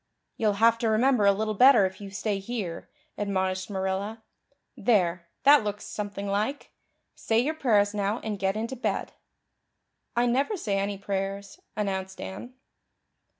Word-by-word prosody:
"You'll 215 -2 +1
have 230 +3 +4
to 230 - +1
remember 220 -1 +3
a - - +7
little 215 +2 -1
better 250 -1 +7
if 190 +2 -5
you 200 - -7
stay 195 +1 -2
here," 195 -5 -5 0.3
admonished 190 -2 -1
Marilla. 195 +3 -3 0.5
"There, 180 -7 +1 0.2
that 285 -2 +7
looks 205 0 -4
something 200 -1 -5
like. 210 +8 -2 0.4
Say 225 - -1
your 270 +7 +2
prayers 210 -9 +2
now 205 +2 -1
and 210 -3 -3
get 195 +2 0
into 230 +4 -3
bed." 220 -5 -2 1.0
"I 240 +1 +3
never 270 - +1
say 200 - -1
any 200 0 -2
prayers," 195 - -4 0.2
announced 190 -2 -3
Anne. 240 +7 -7
205 Hz, 150 wpm, -27 LUFS, 195-230 Hz, 1.0 s, a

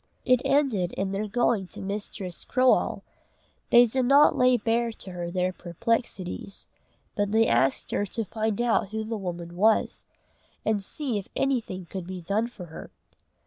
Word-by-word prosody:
It 255 -1 +4
ended 245 -12 +1
in 190 0 -2
their 200 +2 -2
going 215 -3 +1
to - - -10
Mistress 195 -2 -5
Croale. 255 0 +2 0.7
They 240 0 +8
did 255 +2 0
not 285 +4 +6
lay 250 -2 +4
bare 230 +1 0
to 190 - -9
her 175 -1 -4
their 180 +1 0
perplexities, 190 +1 -3 0.5
but 205 -1 0
they 225 +1 +4
asked 135 -8 +1
her 205 - 0
to 225 +4 -3
find 220 +1 -2
out 235 -4 +2
who 220 +1 -3
the 225 +1 -4
woman 175 -2 -6
was, 215 +4 +2 0.6
and 210 -2 +1
see 250 0 -3
if 195 - -10
anything 230 -9 -1
could 180 +1 -7
be 185 -1 -5
done 200 +7 0
for 210 -7 -10
her. 160 - -10
210 Hz, 165 wpm, -26 LUFS, 185-235 Hz, 0.7 s, They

